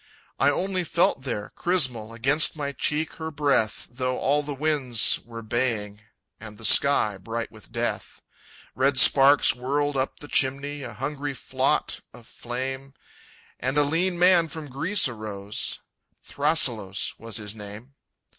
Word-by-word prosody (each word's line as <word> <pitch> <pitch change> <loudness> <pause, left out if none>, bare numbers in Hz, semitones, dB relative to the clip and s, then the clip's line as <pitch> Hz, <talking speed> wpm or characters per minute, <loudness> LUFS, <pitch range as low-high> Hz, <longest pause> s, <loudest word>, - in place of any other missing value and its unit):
I - - +4
only 185 +5 -1
felt 170 -4 +1
there, 105 -5 -4
chrysmal, 130 -11 0
Against 135 +8 +2
my 145 -2 -3
cheek 150 +3 -1
her 160 0 -5
breath, 140 -7 0
Though 130 +1 -3
all 145 +2 +1
the 145 -1 -6
winds 135 -6 +1
were 115 -1 -10
baying, 110 -3 -2 0.4
And 110 -1 -10
the 115 - -7
sky 110 -4 +5
bright 115 +4 -5
with - - -15
Death._ - - -4 0.5
Red 135 +1 +1
sparks 140 +1 +6
whirled 140 +4 -1
up 130 0 -2
the 145 - -10
chimney, 140 +1 0
A 120 -4 -7
hungry 140 +3 -4
flaught - - -1 0.2
of 120 -2 -15
flame, 130 +4 -6 0.6
And 130 +3 -2
a 145 - +5
lean 175 +5 0
man 175 -1 +5
from 155 -3 -8
Greece 170 +7 +1
arose; 105 -3 -4 0.4
Thrasyllos 120 - 0
was 115 -2 -5
his 105 -2 -5
name. 105 +5 -11
135 Hz, 145 wpm, -25 LUFS, 115-145 Hz, 0.6 s, sparks